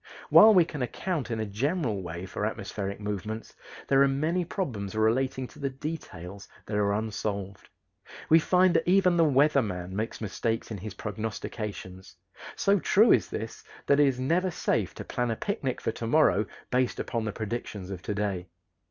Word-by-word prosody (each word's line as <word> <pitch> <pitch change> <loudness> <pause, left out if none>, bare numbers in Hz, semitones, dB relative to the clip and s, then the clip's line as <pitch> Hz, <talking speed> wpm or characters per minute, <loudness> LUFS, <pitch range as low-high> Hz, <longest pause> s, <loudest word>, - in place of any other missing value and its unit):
While 215 0 +9
we 175 -3 +6
can 150 -4 -6
account 150 +2 -2
in 115 -2 -2
a 110 - -1
general 115 - -1
way 85 +1 -6
for 95 - -5
atmospheric 100 -2 -3
movements, 105 +1 -5 0.3
there 135 0 +4
are 140 - +6
many 155 +6 0
problems 115 - -4
relating 130 +4 +1
to - - -16
the 140 -1 -1
details 105 - -7 0.2
that 105 - -4
are 100 -1 +2
unsolved. 100 -2 -3 0.6
We 160 - +7
find 180 +2 +4
that 165 +1 +1
even 185 -1 +4
the 170 - +4
"weather 145 -1 +4
man" 90 -4 -5
makes 110 +2 -3
mistakes 115 +2 -2
in 105 - -4
his 105 +1 -7
prognostications; 105 -3 -6 0.4
so 200 0 +3
true 215 +6 +5
is - - +3
this 110 +1 -6 0.2
that 140 0 +4
it 145 - +6
is 130 -2 0
never 170 +8 +1
safe 165 - -1
to - - -7
plan 120 -1 -1
a 115 - 0
picnic 140 - -2
for - - -1
to 115 0 -5
morrow 115 -6 +3 0.2
based 125 -1 +1
upon 115 -2 -2
the 105 - -1
predictions 105 -3 -5
of 90 -2 -6
to 105 - -3
day. 100 -3 -2
115 Hz, 180 wpm, -28 LUFS, 100-150 Hz, 0.6 s, While